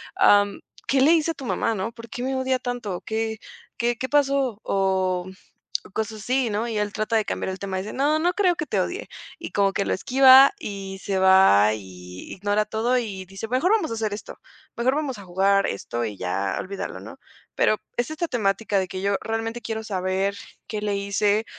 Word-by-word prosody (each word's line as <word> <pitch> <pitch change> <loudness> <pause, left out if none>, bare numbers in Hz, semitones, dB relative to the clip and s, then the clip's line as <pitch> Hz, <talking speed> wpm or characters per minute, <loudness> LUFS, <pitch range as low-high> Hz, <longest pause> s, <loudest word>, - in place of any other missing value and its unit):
am, 205 0 +4 0.3
¿qué 270 -1 +3
le 290 +4 +6
hice 330 0 +2
a - - -4
tu 270 - -8
mamá?", 225 - 0
¿no? 200 +3 -3
"¿Por 230 -1 -12
qué 245 - -5
me 265 0 -1
odia 260 0 +1
tanto? 245 -7 -4
¿Qué 220 0 -2 0.4
qué 240 0 0
qué 260 - -3
pasó?", 275 -6 +2
o, 190 -2 0
mm, - - -8 0.6
cosas 220 0 -3
así, 255 -1 0
¿no? 215 +3 -1
Y 220 -2 -3
él 210 -1 -1
trata 215 +1 -1
de 220 -2 +2
cambiar - - -3
el 185 - -4
tema, 190 -1 -4
dice: 200 +3 -5
"No, 295 +3 +1
no 350 +3 +1
creo 365 -3 +3
que 305 - -4
te 205 - 0
odie". 380 - -3 0.3
Y 335 - -7
como 195 -1 +2
que 200 - 0
lo - - 0
esquiva, 265 - +7
y 195 - -6
se 195 -1 -2
va, 190 - +6
y 90 -3 -10
ignora 205 +2 0
todo, 240 +4 +1
y 195 -5 -5
dice: 195 +4 -7
Mejor 260 - +1
vamos 430 -7 +2
a 230 - -3
hacer 215 -2 -2
esto, 210 - -8 0.4
mejor 250 +3 +2
vamos 280 -5 -2
a 200 - -10
jugar 195 +2 +2
esto 120 +4 -3
y 105 -2 -5
ya 95 +1 -2
olvídalo, 195 +1 -5
¿no?". - - -10 0.4
Pero 215 - +3 0.2
es 240 +5 -1
esta 330 +2 -2
temática 210 -3 0
de 190 - 0
que 185 +1 -6
yo 200 +1 +1
realmente 225 +1 -3
quiero 220 -1 -4
saber 190 -1 -1 0.3
qué 210 -1 -4
le 205 -1 0
hice, 200 +2 +1
215 Hz, 210 wpm, -24 LUFS, 195-250 Hz, 0.6 s, esquiva